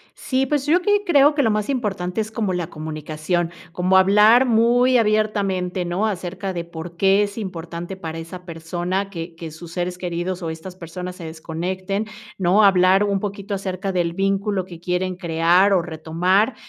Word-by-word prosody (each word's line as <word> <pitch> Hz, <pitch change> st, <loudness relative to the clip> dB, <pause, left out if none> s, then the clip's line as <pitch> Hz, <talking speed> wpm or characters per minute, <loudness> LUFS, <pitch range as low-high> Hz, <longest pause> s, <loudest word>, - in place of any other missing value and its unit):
Sí, 265 Hz, 0 st, 0 dB
pues, 280 Hz, 0 st, 0 dB
yo 315 Hz, +4 st, +4 dB
aquí 410 Hz, +2 st, +2 dB
creo 290 Hz, -4 st, +5 dB
que 285 Hz, -, +2 dB
lo 225 Hz, -, +3 dB
más 210 Hz, +2 st, -1 dB
importante 200 Hz, -8 st, -2 dB
es 220 Hz, 0 st, -2 dB
como 215 Hz, -3 st, -1 dB
la 175 Hz, -2 st, -2 dB
comunicación, 155 Hz, +2 st, -3 dB, 0.2 s
como 180 Hz, +2 st, +2 dB
hablar 210 Hz, +6 st, +6 dB
muy 245 Hz, +2 st, +4 dB
abiertamente, 200 Hz, -5 st, 0 dB
¿no? 175 Hz, +5 st, -1 dB
Acerca 190 Hz, -1 st, -3 dB
de 170 Hz, -1 st, -4 dB
por 170 Hz, 0 st, -9 dB
qué 195 Hz, +2 st, +4 dB
es 200 Hz, +1 st, -5 dB
importante 175 Hz, -2 st, -6 dB
para 165 Hz, -3 st, -6 dB
esa 170 Hz, +2 st, -8 dB
persona 175 Hz, +3 st, -3 dB
que 170 Hz, -3 st, -7 dB
que 165 Hz, -1 st, -8 dB
sus 165 Hz, +2 st, -11 dB
seres 180 Hz, +1 st, -3 dB
queridos 180 Hz, +1 st, -3 dB
o 165 Hz, -, -2 dB
estas 160 Hz, +3 st, -8 dB
personas 180 Hz, +1 st, -7 dB
se 175 Hz, -3 st, -9 dB
desconecten, 185 Hz, +5 st, -3 dB, 0.3 s
¿no? 190 Hz, +3 st, +4 dB
Hablar 190 Hz, 0 st, +5 dB
un 200 Hz, -1 st, 0 dB
poquito 200 Hz, 0 st, -5 dB
acerca 190 Hz, 0 st, -3 dB
del 170 Hz, -2 st, 0 dB
vínculo 195 Hz, +1 st, 0 dB
que 175 Hz, -3 st, -11 dB
quieren 180 Hz, +1 st, -1 dB
crear 175 Hz, +2 st, +3 dB
o 185 Hz, -, +4 dB
retomar, 175 Hz, +7 st, +1 dB
185 Hz, 175 wpm, -22 LUFS, 170-205 Hz, 0.3 s, hablar